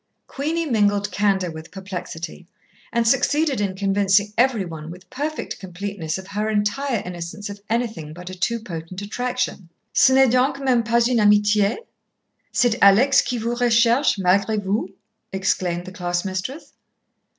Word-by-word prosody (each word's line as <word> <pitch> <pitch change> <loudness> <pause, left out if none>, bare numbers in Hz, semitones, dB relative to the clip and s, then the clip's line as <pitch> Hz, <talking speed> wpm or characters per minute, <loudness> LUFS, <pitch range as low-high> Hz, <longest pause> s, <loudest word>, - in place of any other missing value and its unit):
Queenie 320 +4 -2
mingled 205 -5 +1
candour 195 -4 +1
with 160 0 -9
perplexity, 180 -3 -7 0.4
and 235 -1 +1
succeeded 275 +1 +2
in 195 -2 -1
convincing 200 +1 +2
every 240 -5 +2
one 160 -2 -8
with 180 +2 -11
perfect 295 +4 -4
completeness 185 -3 -5
of 190 - -9
her 210 +2 -2
entire 220 +3 0
innocence 180 +3 -6
of 200 0 -10
anything 220 -10 -2
but 175 +3 -11
a 185 - -6
too 230 +6 -1
potent 180 -4 -7
attraction. 245 -4 -3 0.2
"Ce - - +6
n'est 265 -2 +5
donc 255 +2 +2
même 260 -4 +2
pas 235 +1 +2
une 245 -2 +2
amitié? 205 0 +4 0.7
C'est 245 -3 +3
Alex 235 +8 +6
qui 245 - -3
vous 230 +1 -2
recherche 240 +2 +3
malgré 195 +3 +2
vous!" 195 0 -1 0.4
exclaimed 180 -2 -1
the 185 - -8
class 175 -1 -2
mistress. 195 - -5
205 Hz, 150 wpm, -22 LUFS, 185-240 Hz, 0.7 s, Ce